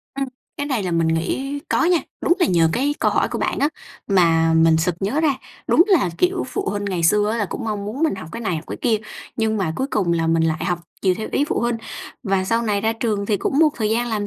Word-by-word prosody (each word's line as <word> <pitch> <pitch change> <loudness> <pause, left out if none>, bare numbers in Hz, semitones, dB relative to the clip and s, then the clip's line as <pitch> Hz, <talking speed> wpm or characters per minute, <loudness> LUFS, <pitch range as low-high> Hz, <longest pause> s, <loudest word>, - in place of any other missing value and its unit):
Ừ, 275 - -2 0.3
cái 285 - -3
này 255 -8 -1
là 180 - -2
mình 165 -1 +1
nghĩ 265 +13 -1
có - - +2
nha! 350 -1 +4 0.2
Đúng - - +2
là 355 - +3
nhờ 165 -3 +3
cái 280 +7 0
câu - - +3
hỏi - - +1
của - - -4
bạn - - -1
á, 285 - +3 0.4
mà 165 -4 +3
mình 160 0 +5
sực 175 +2 +1
nhớ 225 +11 0
ra, 295 -4 +2 0.3
đúng 340 - +6
là, 350 - +3
kiểu, 360 0 +1
phụ - - -3
huynh 205 0 -3
ngày 185 -4 -2
xưa 210 +5 +3
á, 230 - -1
là 210 - 0
cũng 235 - -5
mong 210 -2 -3
muốn 240 +9 -4
mình 315 - +2
học 160 -4 -8
cái 230 - -5
này, 195 -7 -1
học 155 - -6
cái - - -5
kia, 230 -3 +2 0.4
nhưng 220 -1 0
mà 185 -5 -1
cuối 265 - -1
cùng 185 -5 +1
là 165 -1 +1
mình 165 0 +2
lại 160 -1 0
học 175 -2 0 0.2
chiều 185 -2 +3
theo 220 - -5
ý 285 - +2
phụ 295 - -1
huynh 235 0 0 0.5
và 195 -4 0
sau 230 +4 +1
này 205 -3 0
ra 220 +1 +1
trường 215 -3 -2
thì 210 - +1
cũng 270 +8 -1
một 320 -1 +6
thời 215 -2 0
gian 240 +2 +1
làm 210 -2 -2
210 Hz, 275 wpm, -21 LUFS, 175-250 Hz, 0.5 s, đúng